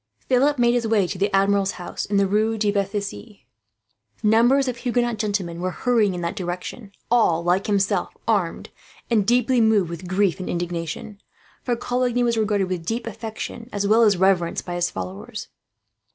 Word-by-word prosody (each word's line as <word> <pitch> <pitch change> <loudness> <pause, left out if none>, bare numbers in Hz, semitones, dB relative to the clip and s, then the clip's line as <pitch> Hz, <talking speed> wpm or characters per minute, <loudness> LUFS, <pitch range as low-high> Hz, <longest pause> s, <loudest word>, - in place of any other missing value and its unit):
Philip 275 +3 +3
made 240 -1 +3
his 240 -2 0
way 215 -3 +3
to 180 +1 -5
the 200 +1 +2
Admiral's 195 0 +2
house 180 - -5
in 200 - 0
the 200 - +4
Rue 215 +3 +1
de 210 -1 +1
Bethisy. 200 - -4 0.8
Numbers 240 +6 +4
of 250 -2 -2
Huguenot 240 -1 0
gentlemen 195 -5 -2
were 185 - 0
hurrying 215 -1 +1
in 175 - -4
that 170 0 -3
direction; 180 +4 -5 0.2
all, 175 -9 +3
like 180 +3 +1
himself, 200 -1 0
armed, - - 0 0.4
and 210 -4 +2
deeply 245 +1 +3
moved 210 -6 +3
with 170 +2 -7
grief 185 -1 +1
and 185 - -5
indignation; 175 +3 -4 0.4
for 245 - -1
Coligny 245 0 0
was 235 -1 +1
regarded 210 -3 +1
with 185 -2 -3
a - - -14
deep 225 +6 -3
affection, 225 +1 -6
as 205 0 -2
well 220 +3 +4
as 210 -4 +4
reverence, 180 -2 +2
by 175 - -6
his 175 0 0
followers. 95 +1 -7
205 Hz, 180 wpm, -23 LUFS, 185-230 Hz, 0.8 s, the